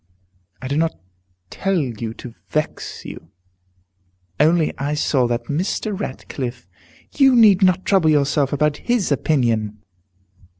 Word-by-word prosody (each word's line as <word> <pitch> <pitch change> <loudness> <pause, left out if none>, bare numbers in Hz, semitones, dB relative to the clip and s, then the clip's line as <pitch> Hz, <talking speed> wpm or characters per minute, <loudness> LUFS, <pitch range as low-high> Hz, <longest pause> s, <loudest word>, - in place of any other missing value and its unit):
"I - - -3
do 140 +2 -1
not 165 +1 0 0.6
tell 195 -1 -1
you 115 -5 -4
to 120 - -10 0.2
vex 155 0 -3
you, 80 - -10 1.1
only 160 0 +3
I 145 +2 -1
saw 135 -4 +1
that 120 0 -2
Mr. 190 +7 -2
Ratcliffe 130 - -6 0.3
" - - -29
"You 270 -2 +6
need 210 -5 +6
not 185 -1 +3
trouble 190 -6 +3
yourself 145 -2 +2
about 150 0 +1
his 240 -9 -1
opinion." 115 -7 0
150 Hz, 130 wpm, -20 LUFS, 130-185 Hz, 1.1 s, You